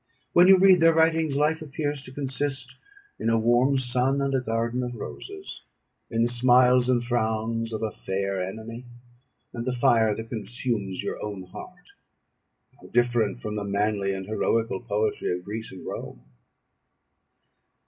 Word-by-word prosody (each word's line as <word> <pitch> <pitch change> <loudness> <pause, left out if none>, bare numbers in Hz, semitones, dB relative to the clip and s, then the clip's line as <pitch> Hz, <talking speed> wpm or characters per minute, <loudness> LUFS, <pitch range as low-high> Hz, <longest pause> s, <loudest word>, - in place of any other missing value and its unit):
When 175 +1 +7
you 190 0 +8
read 185 -1 +6
their 165 0 +5
writings, 160 -2 +2
life 155 +2 +1
appears 145 -1 -3
to 130 - -10
consist 135 -1 -3 0.4
in 115 - 0
a 115 - +3
warm 120 +4 +3
sun 130 +2 +1
and 140 0 0
a 130 - +1
garden 115 +1 -1
of 125 -1 -4
roses, 390 - -8 0.5
in 115 0 +1
the - - +3
smiles 125 +1 +4
and 120 -2 +2
frowns 115 -1 -1
of 110 0 -4
a 110 - -1
fair 95 -1 -3
enemy, 110 +5 -7 0.7
and 120 - -4
the 130 - -1
fire 115 -3 +3
that 115 +1 -7
consumes 110 -3 -3
your - - -4
own 100 -3 -5
heart. 180 - -12 0.9
How - - -13
different 120 -1 +1
from 105 0 -4
the 105 - -2
manly 100 0 0
and 95 -1 -4
heroical 110 0 0
poetry 105 -3 -1
of 90 - -13
Greece 110 +2 -6
and 95 - -10
Rome! - - -7
120 Hz, 160 wpm, -26 LUFS, 110-130 Hz, 0.9 s, you